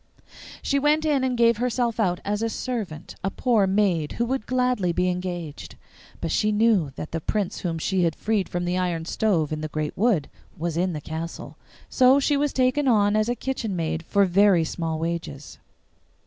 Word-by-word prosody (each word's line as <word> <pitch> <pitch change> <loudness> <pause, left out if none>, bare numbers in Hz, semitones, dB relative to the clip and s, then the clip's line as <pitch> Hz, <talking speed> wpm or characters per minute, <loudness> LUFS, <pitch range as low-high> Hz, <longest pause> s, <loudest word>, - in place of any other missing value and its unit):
She 280 - +1
went 300 +2 +2
in 290 -4 +2
and 255 -2 0
gave 235 -1 +4
herself 240 -1 -1
out 180 -5 +1
as 205 +1 -1
a 230 - 0
servant, 220 -11 -5
a 195 - +1
poor 220 -2 +2
maid 190 -6 +1
who 235 - -1
would 255 -2 -3
gladly 250 -8 +1
be 180 +2 +1
engaged. 175 -4 -5 0.5
But 165 - -2
she 215 - +2
knew 210 -7 +3
that 155 - -7
the 165 - -3
Prince 205 +2 -2
whom 170 -3 -2
she 185 +3 0
had 165 -2 +1
freed 210 -3 -1
from 175 0 -2
the 180 +1 0
iron 170 -3 -1
stove 170 -6 0
in 155 - -4
the 155 - -3
great 155 0 -3
wood 205 -8 +2 0.3
was 165 0 -3
in 180 +1 0
the 150 - -5
castle. 160 +2 -6 0.3
So 260 +2 +5
she 290 +1 +2
was 290 0 +1
taken 260 +2 +1
on 210 -4 +3
as 215 +2 +1
a 240 - 0
kitchen 240 -6 -3
maid 160 -1 -2
for 200 +4 +2
very 190 -1 +4
small 160 0 -3
wages. 165 -3 -5
195 Hz, 195 wpm, -24 LUFS, 165-235 Hz, 0.5 s, So